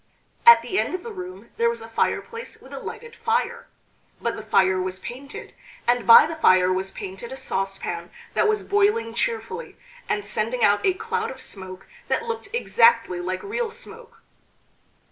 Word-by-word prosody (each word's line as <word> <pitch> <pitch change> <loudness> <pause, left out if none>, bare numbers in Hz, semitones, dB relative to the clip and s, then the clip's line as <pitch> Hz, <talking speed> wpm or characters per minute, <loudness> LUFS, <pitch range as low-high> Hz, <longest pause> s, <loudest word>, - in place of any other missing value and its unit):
At 470 - +10
the 380 - -1
end - - -1
of 370 - -6
the 465 - -6
room 370 -2 -9
there 470 0 +3
was 470 - -4
a - - -9
fireplace 460 +1 -2
with - - -14
a - - -5
lighted 470 -1 -8
fire; 460 +1 -1 0.5
but - - -2
the - - -6
fire 190 -1 +3
was 185 0 -3
painted, 260 +8 -9 0.3
and 240 -3 +2
by 230 - +10
the 320 +1 -4
fire 185 -9 +5
was 190 +1 -2
painted 190 +5 -8
a - - -5
saucepan 195 -8 -3 0.2
that - - +3
was 430 -1 +1
boiling 400 - +2
cheerfully, 230 - -3 0.3
and 205 -1 -1
sending 225 +3 -1
out 205 0 +4
a 380 -2 +3
cloud 455 +3 -2
of - - -9
smoke 185 -2 -7 0.2
that - - 0
looked 455 -3 -4
exactly 230 - +3
like 185 +1 -3
real 460 +3 -2
smoke. 460 0 -11
255 Hz, 175 wpm, -24 LUFS, -, 0.5 s, At